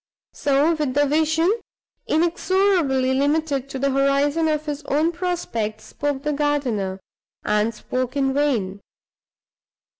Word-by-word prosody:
So, 285 +4 +2
with 300 -5 -2
vision 315 +5 +2 0.5
inexorably 335 -5 +2
limited 285 0 0
to 270 - -5
the 275 +1 0
horizon 280 +4 +2
of 305 -1 -1
his 295 -1 -4
own 305 +4 +1
prospects, 330 - -3
spoke 285 -2 -3
the 300 0 0
gardener, 255 -10 -1 0.5
and 210 +2 +2
spoke 255 +4 -3
in 270 -1 +1
vain. 225 -9 0
285 Hz, 115 wpm, -22 LUFS, 260-315 Hz, 0.5 s, So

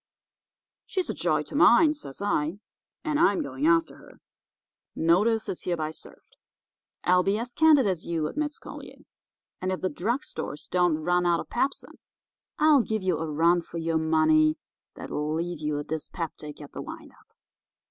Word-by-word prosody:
"'She's 375 -2 -2
a - - -4
joy - - 0
to - - -12
mine,' 315 -2 +6
says 200 - -8
I, 165 -3 0 0.5
'and 305 -2 0
I'm 340 -1 +3
going 290 +1 -2
after 330 0 +2
her. - - -17 0.8
Notice 210 +7 +2
is 180 - -4
hereby 160 -3 -2
served.' - - -13 0.7
"'I'll 180 0 +4
be 195 +3 +1
as 240 +2 -5
candid 310 -5 +5
as 185 -5 -1
you,' 165 -2 -2
admits 300 - -3
Collier, - - -11 0.6
'and 185 +1 -1
if 185 - -2
the 185 - 0
drug 230 - -1
stores 145 - -6
don't 175 -3 +2
run 175 +3 +1
out 170 -1 +3
of - - -7
pepsin 270 +3 -2 0.6
I'll 305 -3 +5
give 220 -3 -2
you 180 -4 0
a 160 -1 -3
run 170 +3 +3
for 170 - -9
your 165 -1 0
money 155 -1 +3 0.4
that'll 150 +1 -3
leave 170 0 -3
you 150 -1 -2
a 145 - -3
dyspeptic 155 -1 -6
at 145 - -11
the - - -6
wind - - -9
up. - - -26
175 Hz, 170 wpm, -26 LUFS, 160-235 Hz, 0.8 s, mine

